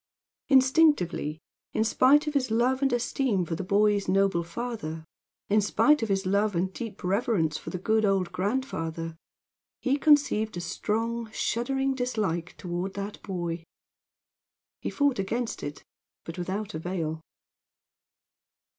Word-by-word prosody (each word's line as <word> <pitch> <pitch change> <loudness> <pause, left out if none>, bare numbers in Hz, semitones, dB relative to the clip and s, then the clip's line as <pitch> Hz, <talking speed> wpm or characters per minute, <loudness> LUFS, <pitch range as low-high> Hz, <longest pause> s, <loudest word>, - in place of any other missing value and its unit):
Instinctively 260 - +4 0.4
in 220 - +2
spite 265 +6 +4
of 300 - -2
his 265 -3 +1
love 245 +4 +2
and 270 -1 +2
esteem 240 -5 0
for 165 - -4
the 190 - -4
boy's 205 +1 +2
noble 195 -1 +2
father; 170 -4 -5 0.4
in 210 +1 +3
spite 295 +8 +3
of 225 - -1
his 195 0 0
love 200 +1 +1
and 185 +2 0
deep 225 -3 -7
reverence 190 - +1
for - - -6
the - - -4
good 220 +4 +1
old 195 -4 +1
grandfather, 170 -6 -2 0.6
he 275 +1 +1
conceived 280 - +3
a - - -2
strong, 225 +6 -2
shuddering 270 +5 0
dislike 215 -10 -2
toward 180 +2 -4
that 200 +1 -5
boy. 175 -3 -4 1.2
He - - -2
fought 285 -5 +1
against 230 +5 -2
it, 145 0 -6 0.4
but 165 - -7
without 195 +4 -4
avail. 160 -1 -3
205 Hz, 135 wpm, -27 LUFS, 180-245 Hz, 1.2 s, Instinctively